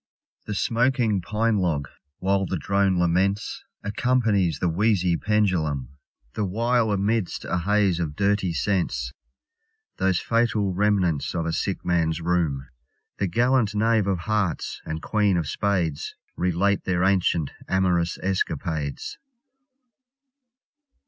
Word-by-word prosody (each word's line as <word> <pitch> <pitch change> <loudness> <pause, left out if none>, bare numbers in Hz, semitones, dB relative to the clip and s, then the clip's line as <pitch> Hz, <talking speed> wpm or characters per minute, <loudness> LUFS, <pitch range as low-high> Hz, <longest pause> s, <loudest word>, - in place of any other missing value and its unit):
The 105 - -3
smoking 120 -3 +1
pine 110 +3 0
log, 75 -7 0 0.3
while 95 0 +1
the 95 - -2
drone 100 0 +1
laments, 90 +4 0 0.2
Accompanies 100 - +1
the 90 - 0
wheezy 90 0 +2
pendulum, 85 - 0 0.4
The 105 - -2
while 115 +4 +1
amidst 100 0 -1
a 90 - -1
haze 100 -1 +2
of 75 -4 -3
dirty 100 -1 +1
scents, 80 -10 -1 0.8
Those 95 -2 +2
fatal 115 -4 +1
remnants 95 -7 +1
of 85 -1 -1
a 85 - -1
sick 95 +3 -2
man's 80 -2 +1
room 80 -6 0 0.5
The 100 - +1
gallant 120 +2 +2
knave 110 -1 +2
of 95 -4 0
hearts 100 -4 -1
and 80 +1 -4
queen 105 -4 +2
of 80 -3 -1
spades 90 -8 -1 0.2
Relate 90 +3 +1
their 90 -1 +1
ancient 90 -5 +2 0.2
amorous 90 -2 +1
escapades. 80 -6 -2
95 Hz, 120 wpm, -24 LUFS, 85-105 Hz, 0.8 s, wheezy